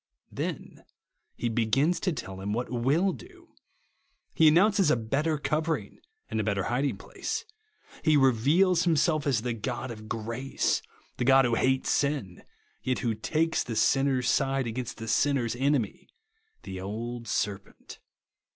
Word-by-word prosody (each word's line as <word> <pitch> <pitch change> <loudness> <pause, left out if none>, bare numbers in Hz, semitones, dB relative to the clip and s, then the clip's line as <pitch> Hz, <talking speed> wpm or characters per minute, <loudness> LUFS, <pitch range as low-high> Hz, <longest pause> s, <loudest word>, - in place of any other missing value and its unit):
Then - - -5 0.5
he 120 - -2
begins 120 +9 +1
to 185 - 0
tell 95 - -6
him 100 +2 -2
what 120 +1 -3
will 140 +11 +2
do. 360 -2 -14 0.8
He 160 - +5
announces 195 +3 +4
a - - +4
better 140 +8 -1
cover 150 +3 0
ing 100 -4 -13 0.3
and 110 - -2
a - - +1
better 100 -2 0
hiding 135 +6 -1
place. - - -5 0.6
He 155 -2 +4
reveals 145 +8 +4
himself 155 -3 +2
as 120 -6 +1
the 125 -1 -1
God 120 +3 -4
of 110 -1 -10
grace, 115 +5 -1 0.4
the - - -1
God 135 0 +6
who 120 - +1
hates 130 +3 +1
sin, 140 -11 -1 0.4
yet 130 -1 -1
who 115 - +2
takes 160 +9 0
the 115 - -5
sinner's 135 0 +2
side 135 -1 +1
against 120 +1 -4
the 110 - -7
sinner's 125 -1 +1
enemy, 135 -3 -1 0.3
— 445 0 -43
the 95 -1 -6
old 115 +4 -5
serpent. 100 -1 -4
130 Hz, 150 wpm, -28 LUFS, 115-150 Hz, 0.8 s, God